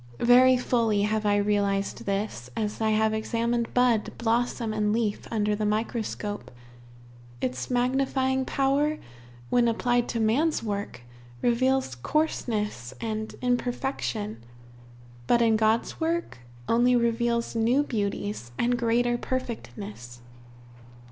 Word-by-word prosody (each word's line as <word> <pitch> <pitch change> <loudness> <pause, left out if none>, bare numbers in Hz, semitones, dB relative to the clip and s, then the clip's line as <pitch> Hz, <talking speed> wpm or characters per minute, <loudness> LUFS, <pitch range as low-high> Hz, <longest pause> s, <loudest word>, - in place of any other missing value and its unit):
Very 250 +2 +6
fully 230 -4 +1
have 215 0 0
I 205 - +3
realized 200 -1 0
this, 195 - -3
as 210 0 -2
I 220 - +2
have 220 0 +2
examined 230 +2 -1
bud, 245 -3 +3
blossom, 235 -1 0
and 210 -1 +1
leaf 220 -2 -1
under 210 -2 0
the 215 - -3
microscope. 210 -1 -2 0.9
Its 130 0 -3
magnifying 265 +1 +1
power 280 +3 +1 0.5
when 240 -1 +4
applied 240 +1 +1
to 230 - -2
man's 260 +9 +2
work, 200 - -4 0.4
reveals 255 - +2
coarseness 210 - -2
and 220 -1 -4
imperfection, 245 - -2 0.8
but 240 - +4
in 225 -1 +4
God's 220 +1 +1
work 330 - -1 0.3
only 245 +2 +4
reveals 235 0 0
new 235 +5 +3
beauties, 205 - -3
and 245 0 +1
greater 240 +1 +1
perfectness. 210 - -5
230 Hz, 115 wpm, -26 LUFS, 210-245 Hz, 0.9 s, Very